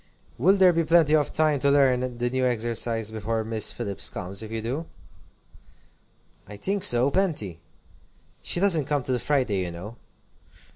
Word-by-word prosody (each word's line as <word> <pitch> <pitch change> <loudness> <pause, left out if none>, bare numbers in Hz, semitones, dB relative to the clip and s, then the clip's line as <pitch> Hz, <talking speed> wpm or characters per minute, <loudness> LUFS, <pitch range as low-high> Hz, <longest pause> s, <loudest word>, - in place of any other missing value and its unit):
"Will 195 - +4
there 185 -2 +5
be 165 0 +1
plenty 160 -1 +4
of 150 -2 +1
time 155 -2 +1
to 140 - +2
learn 130 -3 +2
the 120 0 -1
new 130 0 -1
exercise 115 -2 -1
before 110 +1 -2
Miss 110 0 -1
Phillips 100 -5 -4
comes, 95 +2 -6
if 110 0 -8
you 115 - -3
do?" 130 +9 -4 1.6
"I 105 +1 -10
think 195 - -2
so, 120 +3 +4
plenty. 145 - -1 0.8
She - - -1
doesn't 175 -7 +2
come 145 -2 -1
till 125 -1 -1
Friday, 125 -8 0
you 90 - -4
know." 95 +7 -9
125 Hz, 160 wpm, -25 LUFS, 110-150 Hz, 1.6 s, there